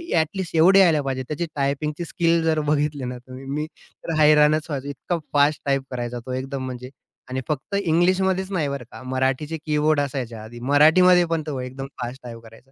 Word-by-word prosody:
At least 165 +2 -1
एवढे 185 +5 +6
यायला 165 -5 +5
पाहिजे. 130 -1 -3
त्याची 155 +4 -2
टायपिंगची 150 +4 -2
स्किल 170 -1 +1
जर 160 -1 +2
बघितले 145 -2 0
ना 125 0 -5
तुम्ही, 130 +2 -11
मी 145 +3 -3
तर 165 - -10
हैराणच 150 0 +5
व्हायचो. 140 -2 -4
इतका 145 +5 -3 0.2
फास्ट 145 +1 +3
टाइप 135 -1 +1
करायचा 120 -1 -4
तो 130 - -5
एकदम. 130 +1 -4
म्हणजे 125 0 -7 0.4
आणि 130 +1 -3
फक्त 150 +6 -3
इंग्लिशमध्येच 190 +1 +1
नाही 165 -7 0
बरं 140 -2 -4
का, - - -10
मराठीचे 130 +4 -1
कीबोर्ड 150 0 +2
असायच्या 125 -6 -3
आधी. 120 +2 -10
मराठीमध्ये 175 +5 +6
पण 165 -2 -2
तो 140 -4 -3
एकदम 130 +2 -6
फास्ट 125 +2 -5
टाइप 115 -1 -8
करायचा. 115 +4 -17
145 Hz, 185 wpm, -23 LUFS, 130-160 Hz, 0.4 s, एवढे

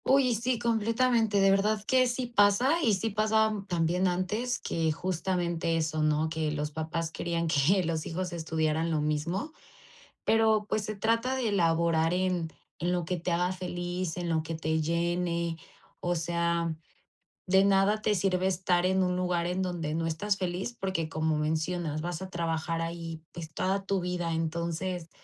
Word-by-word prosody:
Uy, 270 -1 +4
y 240 - +2
sí, 240 +3 0
completamente, 230 -1 +2
de 195 0 +5
verdad 205 +2 +2
que 255 +3 +3
sí 245 +1 -2
pasa, 240 +8 +3
y 225 -9 +3
sí 220 +4 -2
pasaba 215 0 +2
también 175 +1 +1
antes, 210 +8 -1
que 160 -1 0
justamente 170 -1 -1
eso, 155 -1 -1
¿no? 155 +1 +2
Que 160 -1 -1
los 150 0 -3
papás 160 +2 -3
querían 170 0 -2
que 160 +6 +3
los 160 -2 -2
hijos 180 +1 -3
estudiaran 160 0 0
lo 160 -2 +1
mismo, 165 - -2 0.7
pero, 220 -1 +3
pues 215 -1 -1
se 215 - -4
trata 230 +5 +1
de 245 -5 0
laborar 165 -2 +2
en, 180 -3 0 0.3
en 175 +1 0
lo 175 -2 -1
que 180 +2 -2
te 175 +1 -3
haga 175 +2 +1
feliz, 175 -1 -4
en 175 -1 -3
lo 160 -1 +1
que 160 +1 -5
te 160 0 0
llene. 170 +1 -1 0.4
O 175 0 -1
sea, 170 0 0 0.7
de 190 +1 +4
nada 200 +2 +3
te 210 -1 +2
sirve 185 0 +1
estar 180 -1 +1
en 190 0 +3
un 180 0 0
lugar 180 -2 0
en 180 +2 -1
donde 170 -4 -3
no 165 0 -1
estás 195 +6 -1
feliz, 185 +5 -3
porque, 190 -5 -2
como 155 -1 0
mencionas, 160 +1 -1
vas 170 +1 -4
a 190 - -6
trabajar 165 -1 -2
ahí, 165 -1 -5
pues, 160 -2 -8
toda 195 +3 -1
tu 195 0 0
vida, 175 -1 -2
entonces, 170 +2 -2
175 Hz, 175 wpm, -29 LUFS, 165-195 Hz, 0.7 s, de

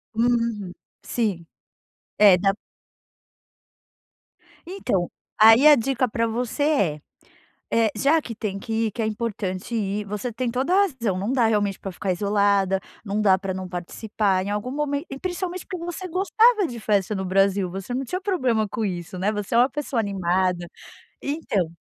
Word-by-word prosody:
Uhum. 230 -4 0 0.3
Sim. 205 -8 -2 0.7
É, 200 -3 +7
na 195 +1 +2 2.1
Então. 250 - -2 0.3
Aí 225 +7 +8
a 300 - +9
dica 255 0 0
pra 230 +1 0
você 240 +5 -2
é. 200 - +1 0.7
Eh, 225 -1 +3
já 290 +9 +3
que 235 -6 -7
tem 205 -2 -4
que 225 - -7 0.2
ir - - -5
que 220 - -6
é 220 - +1
importante 215 -1 -3
ir 205 -1 -2
você 210 +4 -4
tem 245 +2 -2
toda 260 +7 -1
a - - +5
razão. 235 - -2
Não 205 +6 -2
dá 250 -4 +3
realmente 205 -3 0
pra 195 - -6
ficar 190 +2 -3
isolada, 200 0 +2 0.2
não 205 0 -2
dá 190 -2 +5
pra 190 -1 -4
não 185 -1 -5
participar 190 +2 -1
em 200 - -4
algum 210 +5 -3
momento 290 +2 -2
e 270 - -7
principalmente, 365 0 -4
porque 360 -3 -5
você 350 +2 -5
gostava 410 +4 +3
de 240 -6 -7
festa 210 -1 +1
no 190 -1 -3
Brasil. 195 0 +2
Você 195 +6 -5
não 265 +2 -2
tinha 360 +9 -3
problema 255 - 0
com 220 - -3
isso, 180 -2 -4
né. 200 +3 +1
Você 210 0 -4
é - - +5
uma 250 +3 +5
pessoa 280 -3 -2
animada. 185 -3 0 0.5
Então. 275 - -1
215 Hz, 170 wpm, -24 LUFS, 195-260 Hz, 2.1 s, a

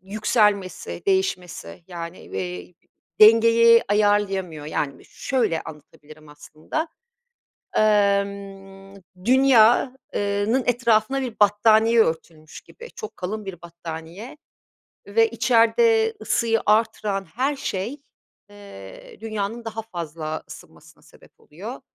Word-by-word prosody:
yükselmesi, 200 - -1
değişmesi, 180 - -2
yani, 170 0 -8
eee, 90 - -7 0.5
dengeyi 230 +1 +7
ayarlayamıyor. 195 -6 0
Yani 145 -2 -3
b - - -18
şöyle 225 - -2
anlatabilirim 155 0 -14
aslında. 155 - -6 0.9
Imm, 200 -2 0 0.3
Dünya, 255 0 +4 0.2
ııı 205 +1 -1
nın 260 +1 +2
etrafına 235 +1 +1
bir 245 -4 -5
battaniye 220 +2 +4
örtülmüş 160 -3 -5
gibi. 475 0 -14
Çok 435 - -8
kalın 210 +4 -5
bir 185 -3 -9
battaniye 170 - -9 0.7
ve 225 +3 +2
içeride 260 - +3
ısıyı 225 -1 0
arttıran 210 -2 +1
her 260 - -2
şey, 245 +1 -4 0.5
ııı, 200 - -12 0.3
Dünya'nın 220 +1 -4
daha 225 0 -5
fazla 165 -6 -6
ısınmasına - - -15
sebep - - -22
oluyor, - - -9
205 Hz, 100 wpm, -23 LUFS, 170-230 Hz, 0.9 s, dengeyi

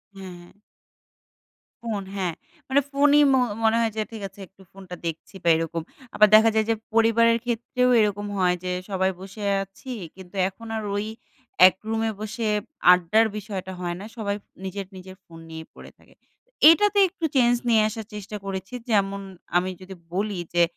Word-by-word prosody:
হ্যাঁ, 190 -2 -9
হ্যাঁ। 175 +3 -17 1.3
phone 210 -4 -3
হ্যাঁ, 180 -4 -1 0.3
মানে 275 +2 +3
phone 285 +1 +4
ই - - +7
ম - - +5 0.3
মনে 225 +1 +4
হয় 225 -1 +1
যে - - +1
ঠিক 220 -2 -8
আছে 195 +2 -20
একটু 190 +1 -23
phone 195 0 -13
টা - - -4
দেখছি 165 +3 -6
বা 170 - +3
এরকম। 165 0 -2 0.3
আবার 215 - +7
দেখা 225 +1 +7
যায় 220 -1 +3
যে 225 - +3 0.2
পরিবারের 230 0 +4
ক্ষেত্রেও 245 +2 0
এরকম 205 -1 0
হয় 180 -1 +2
যে 180 - -2 0.2
সবাই 190 0 +1
বসে 195 +2 -9 0.2
আছি 200 +7 -11 0.2
কিন্তু 190 0 -13
এখন 230 +4 -13
আর 215 - -4
ওই 205 +1 -1 0.6
এক 185 - +1
রুমে 225 0 0
বসে 215 +1 -3 0.4
আড্ডার 180 +6 +4
বিষয়টা 195 -3 -6
হয় 175 -1 -3
না 205 - -8
সবাই 200 -2 -2 0.3
নিজের, 195 +1 -5
নিজের 185 0 -11
phone 165 -1 -13
নিয়েই 160 0 -8
পড়ে - - -13
থাকে। - - -23 0.6
এটাতে 410 +4 +4
একটু 335 -3 -4
change 240 -1 +4
নিয়ে 220 -2 +5
আসার 220 0 -6
চেষ্টা 210 +1 -7
করেছি 190 +3 -5 0.2
যেমন 200 -1 +1 0.4
আমি 185 +1 0
যদি 190 0 -10 0.2
বলি 200 -1 -2
যে 175 0 +4
205 Hz, 175 wpm, -24 LUFS, 185-225 Hz, 1.3 s, ই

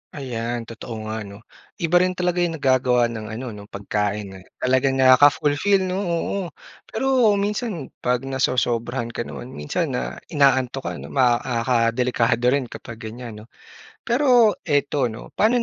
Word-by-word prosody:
Ayan 120 -4 -3
totoo 115 -1 -8
nga 110 +1 -4
'no, 100 +3 -12 0.4
iba 175 +2 +4
rin 185 0 +1
talaga 180 -1 0
yung 175 -2 0
nagagawa 130 -4 +2
ng 110 -2 -6
ano 115 +3 -6
'no 105 -1 -10
pagkain, 105 -1 -3
eh, 95 - -18
talagang 130 +1 +1
nakaka-fulfill 145 +8 +4
'no, 185 +1 -2
oo. 175 +1 -1 0.5
Pero 250 -3 +2
minsan 205 - -2
'pag 125 +1 0
nasosobrahan 120 -2 -1
ka 120 - -4
naman 125 - -8
minsan 75 0 -2
na - - -3 0.2
inaantok 135 -2 +2
ka - - -2
'no, - - -9
ma 125 -3 +4
ah, 120 -3 -1
ka 125 - +3
delikado 120 -1 +1
rin 130 -1 +1
kapag 115 -1 -9
ganyan 110 -1 -8
'no. 115 - -21 0.5
Pero 245 -4 +4
ito 145 -3 +1
'no, 110 -1 -8
paano 235 +3 +3
130 Hz, 155 wpm, -22 LUFS, 115-170 Hz, 0.5 s, iba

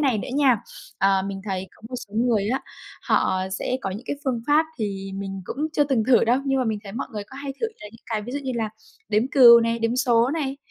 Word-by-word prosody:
này 265 -7 +2
nữa - - -5
nha. 270 -5 +5 0.4
Ờ, 195 0 +3
mình 195 -1 -5
thấy 190 0 -2
có - - -25
một 255 - -8
số 205 - -15
người 225 -3 +1
á, 260 +3 0 0.4
họ 185 0 +1 0.2
sẽ 255 - -1
có 195 - -2
những 215 +6 -7
cái - - -2
phương 250 -4 0
pháp 305 +2 +4
thì 195 -2 -3
mình 195 -1 -5
cũng - - -6 0.2
chưa 295 -2 +3
từng 255 -6 +1
thử 245 -2 +5
đâu, 240 +3 +3
nhưng 270 0 +2
mà 260 - +1
mình 220 -3 -1
thấy 195 - -8
mọi - - -4
người 210 - -4
có 270 - -12
hay 280 0 -5
thử 455 - +1
là - - -8
những 225 - -17
cái 215 -2 -2
ví 245 +4 -7
dụ 285 - -1
như 265 -2 -4
là 225 -2 -1 0.4
đếm 215 0 +2
cừu 240 -5 +8
này, 230 0 0
đếm 230 +2 0
số 240 -1 +3
này. 280 -3 -2
230 Hz, 265 wpm, -24 LUFS, 205-265 Hz, 0.4 s, cừu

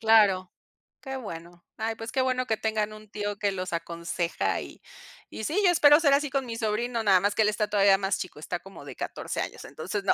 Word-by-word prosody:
Claro. 205 -5 +4 0.5
Qué 265 -1 -6
bueno. 175 -6 -9
Ay, 225 +1 -1
pues, 225 +1 -7
qué 265 - +1
bueno 255 -1 +1
que 220 - +1
tengan 215 -1 -1
un 215 0 -12
tío 205 -1 -3
que 205 -1 +1
los 185 -2 -4
aconseja, 170 +1 -2
y - - -10 0.5
y 220 - -6
sí, 350 - +1
yo 360 - +7
espero 295 -3 +7
ser 290 -4 +3
así 285 0 +2
con 270 -1 0
mi 230 -1 -5
sobrino, 230 +2 -1
nada 195 -3 +5
más 205 +2 +1
que 220 - +3
él 210 - +3
está 210 0 0
todavía 200 -2 +5
más 195 -1 0
chico, 180 -5 -6
está 170 +3 -4
como 195 +1 -12
de - - -8
14 - - -4
años, - - -5
entonces, 205 -2 -5
no, - - +4
210 Hz, 230 wpm, -27 LUFS, 195-235 Hz, 0.5 s, yo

